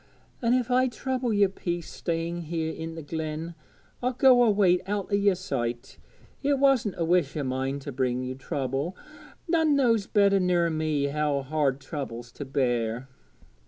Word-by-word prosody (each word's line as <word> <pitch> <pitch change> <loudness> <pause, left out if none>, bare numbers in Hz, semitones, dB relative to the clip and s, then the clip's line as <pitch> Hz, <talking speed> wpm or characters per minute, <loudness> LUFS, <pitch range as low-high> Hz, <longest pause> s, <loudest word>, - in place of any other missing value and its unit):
An' 240 0 +3
if 250 -1 0
I 255 +1 +4
trouble 255 0 -2
yer 205 -1 +4
peace 175 -3 -4
staying 170 0 -3
here 160 0 -2
i' 160 - -5
the 165 - -7
glen, 160 +2 -4 0.5
I'll 250 +1 0
go 250 0 +6
away 200 -6 +4
out 205 0 -2
o' - - +4
yer 200 -1 +3
sight. 120 -9 -4 0.4
It 280 0 +2
wasn't 265 -7 +3
a 165 - 0
wish 170 -4 +1
o' 145 - -1
mine 130 +1 -2
to 140 - -6
bring 130 -1 -1
ye 130 0 -3
trouble. 135 +4 -3 0.5
None 320 -3 +3
knows 230 -7 +2
better 200 -1 +4
ner 175 -2 +2
me 155 -2 0
how 145 -1 0
hard 140 -1 0
trouble's 120 -6 -6
to 145 - -7
bear.' 125 -2 -1
165 Hz, 165 wpm, -27 LUFS, 140-205 Hz, 0.5 s, go